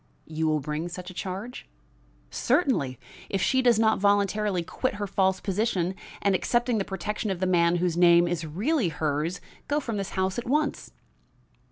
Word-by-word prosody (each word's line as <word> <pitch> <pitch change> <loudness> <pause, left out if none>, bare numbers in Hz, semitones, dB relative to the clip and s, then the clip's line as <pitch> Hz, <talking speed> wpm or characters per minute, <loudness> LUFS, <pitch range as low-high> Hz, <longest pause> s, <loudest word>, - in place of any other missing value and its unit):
"You 160 0 -2
will 155 -1 +2
bring 150 +4 -3
such 180 +1 -7
a - - -12
charge?" 195 +7 -6 0.6
"Certainly, 240 - +1 0.3
if 195 - -1
she 260 +7 +2
does 240 -3 +4
not 220 0 +3
voluntarily 200 -1 +2
quit 255 +7 -2
her 205 0 -3
false 190 -1 +1
position, 195 -3 -1 0.3
and, 200 - +3
accepting 240 +4 +1
the - - 0
protection 205 +3 -4
of 190 -3 -2
the 185 - 0
man 175 -1 +3
whose 175 -1 0
name 175 0 +6
is 170 -1 -2
really 200 - 0
hers, 155 +3 -2 0.3
go 290 +1 +1
from 230 -7 -4
this 195 -1 -3
house 190 +4 0
at 240 - -7
once." 295 +2 0
190 Hz, 175 wpm, -26 LUFS, 175-220 Hz, 0.6 s, name